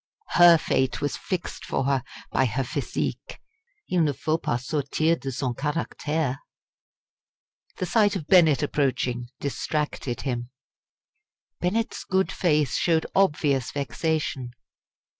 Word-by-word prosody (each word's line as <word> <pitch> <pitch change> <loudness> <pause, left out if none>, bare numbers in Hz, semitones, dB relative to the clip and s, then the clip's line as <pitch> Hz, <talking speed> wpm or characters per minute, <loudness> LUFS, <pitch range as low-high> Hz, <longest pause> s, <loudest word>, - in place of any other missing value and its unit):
Her 175 -1 +7
fate 130 -4 0
was 145 - -1
fixed 185 -3 -4
for - - -1
her 135 -2 +1 0.3
by 130 - +3
her 130 +3 -1
physique. 125 - -4 0.5
Il 180 - +2
ne 150 -3 +2
faut 155 +4 -1
pas 120 +1 -2
sortir 155 +3 +1
de 135 - -4
son 130 0 -2
caractère. 150 0 -2 1.4
The - - -1
sight 205 +3 +3
of 170 -6 -4
Bennett 160 -6 +5
approaching 130 -4 0
distracted 145 -3 -2
him. 120 -3 -3 1.1
Bennett's 220 +6 -1
good 190 +1 +1
face 150 -8 +1
showed 165 -2 +2
obvious 150 -8 +2
vexation. 140 -3 -2
150 Hz, 120 wpm, -25 LUFS, 130-165 Hz, 1.4 s, Her